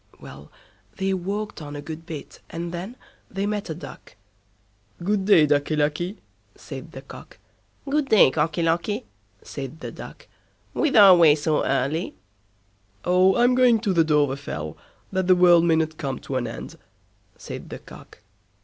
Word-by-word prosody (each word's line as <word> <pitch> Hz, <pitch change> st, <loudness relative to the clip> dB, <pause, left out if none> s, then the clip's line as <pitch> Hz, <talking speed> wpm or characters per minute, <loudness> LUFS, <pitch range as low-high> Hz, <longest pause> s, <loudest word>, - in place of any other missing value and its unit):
Well! 70 Hz, +2 st, -12 dB, 0.5 s
they 195 Hz, 0 st, 0 dB
walked 200 Hz, +2 st, -4 dB
on 145 Hz, -1 st, -8 dB
a 145 Hz, -, -6 dB
good 160 Hz, +2 st, -8 dB
bit, 155 Hz, -4 st, -8 dB
and 170 Hz, +1 st, -5 dB
then 180 Hz, +7 st, -6 dB, 0.3 s
they 195 Hz, +1 st, -3 dB
met 205 Hz, -2 st, -3 dB
a 160 Hz, -, -3 dB
Duck. 170 Hz, -, -12 dB, 0.9 s
"Good 200 Hz, +1 st, 0 dB
day, 190 Hz, -7 st, +6 dB
Ducky 145 Hz, +1 st, +1 dB
Lucky", 155 Hz, +6 st, -1 dB, 0.4 s
said -, -, -10 dB
the -, -, -9 dB
Cock. -, -, -13 dB, 0.5 s
"Good 285 Hz, 0 st, 0 dB
day, 210 Hz, -11 st, +6 dB
Cocky 160 Hz, +3 st, 0 dB
Locky", 170 Hz, -, -1 dB, 0.4 s
said 140 Hz, +2 st, -7 dB
the -, -, -7 dB
Duck, -, -, -11 dB, 0.5 s
"whither 270 Hz, -8 st, +4 dB
away 170 Hz, -6 st, +7 dB
so 155 Hz, 0 st, 0 dB
early?" 140 Hz, +6 st, -1 dB, 0.9 s
"Oh, 185 Hz, +1 st, +4 dB
I'm 245 Hz, +1 st, +4 dB
going 250 Hz, -3 st, +4 dB
to 205 Hz, -4 st, 0 dB
the 165 Hz, -2 st, +4 dB
Dovrefell, 140 Hz, -, -1 dB, 0.4 s
that 190 Hz, -1 st, -1 dB
the 185 Hz, -, +6 dB
world 175 Hz, -1 st, +5 dB
mayn't 160 Hz, -1 st, +1 dB
come 135 Hz, -4 st, -3 dB
to 135 Hz, -, -5 dB
an 125 Hz, -2 st, -1 dB
end", -, -, -8 dB, 0.6 s
said -, -, -9 dB
the -, -, -7 dB
Cock. -, -, -15 dB
170 Hz, 155 wpm, -24 LUFS, 150-195 Hz, 0.9 s, away